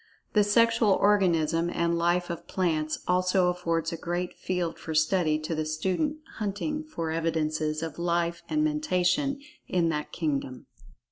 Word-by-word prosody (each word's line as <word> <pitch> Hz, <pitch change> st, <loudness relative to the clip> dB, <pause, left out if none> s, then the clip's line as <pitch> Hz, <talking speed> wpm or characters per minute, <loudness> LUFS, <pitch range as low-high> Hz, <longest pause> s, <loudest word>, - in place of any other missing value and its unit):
The 210 Hz, -, +5 dB
sexual 230 Hz, 0 st, +4 dB
organism 170 Hz, -5 st, +2 dB
and 170 Hz, 0 st, 0 dB
life 175 Hz, +1 st, +1 dB
of 170 Hz, -, -7 dB
plants 155 Hz, -4 st, 0 dB
also 185 Hz, 0 st, +3 dB
affords 165 Hz, -2 st, -1 dB
a -, -, -4 dB
great 175 Hz, +2 st, -3 dB
field 180 Hz, -2 st, -3 dB
for 160 Hz, -, -5 dB
study 155 Hz, 0 st, +3 dB
to 155 Hz, +2 st, -4 dB
the 155 Hz, 0 st, -1 dB
student 185 Hz, -, -1 dB, 0.2 s
hunting 220 Hz, +10 st, -2 dB
for 165 Hz, -, -4 dB
evidences 155 Hz, -1 st, -1 dB
of 165 Hz, 0 st, -5 dB
"life" 170 Hz, 0 st, 0 dB
and 305 Hz, 0 st, +1 dB
"Mentation" 285 Hz, -, +1 dB, 0.3 s
in 170 Hz, -2 st, +1 dB
that 150 Hz, -2 st, -3 dB
kingdom. 140 Hz, -5 st, -3 dB
175 Hz, 145 wpm, -27 LUFS, 160-195 Hz, 0.3 s, The